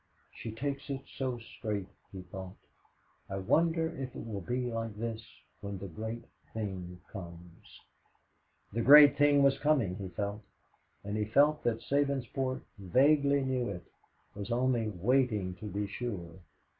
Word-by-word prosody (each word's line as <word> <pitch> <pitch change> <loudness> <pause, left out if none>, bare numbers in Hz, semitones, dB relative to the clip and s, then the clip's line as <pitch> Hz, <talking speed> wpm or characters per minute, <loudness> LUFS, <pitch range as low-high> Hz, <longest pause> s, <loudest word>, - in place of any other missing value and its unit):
"She 115 - -6
takes 140 +5 -4
it 135 -1 -3
so 130 -2 -2
straight," 110 -3 -4 0.3
he 95 -2 -8
thought. 95 0 -8 0.7
"I 95 - -3
wonder 160 - +2
if 130 -4 -6
it - - -6
will 105 -3 -4
be 125 +7 -2
like 115 -2 -3
this 115 +1 -4 0.4
when 100 -1 -5
the 100 +1 -6
great 110 +7 -5 0.3
thing 95 -5 -4
comes." 85 -3 -11 0.9
The 115 - 0
great 145 +3 +9
thing 145 -1 +5
was 135 0 +4
coming, 130 -12 +2
he 100 - -5
felt, 100 +2 -3 0.6
and 100 +1 -3
he 105 - 0
felt 145 +7 +3
that 115 -1 +1
Sabinsport 135 -2 0 0.2
vaguely 140 - +4
knew 130 -3 0
it 90 -3 -6 0.5
was 100 +1 -6
only 120 -2 +2
waiting 105 -1 +1
to 95 - -9
be 105 +1 -2
sure. 100 -5 -5
115 Hz, 145 wpm, -31 LUFS, 100-135 Hz, 0.9 s, great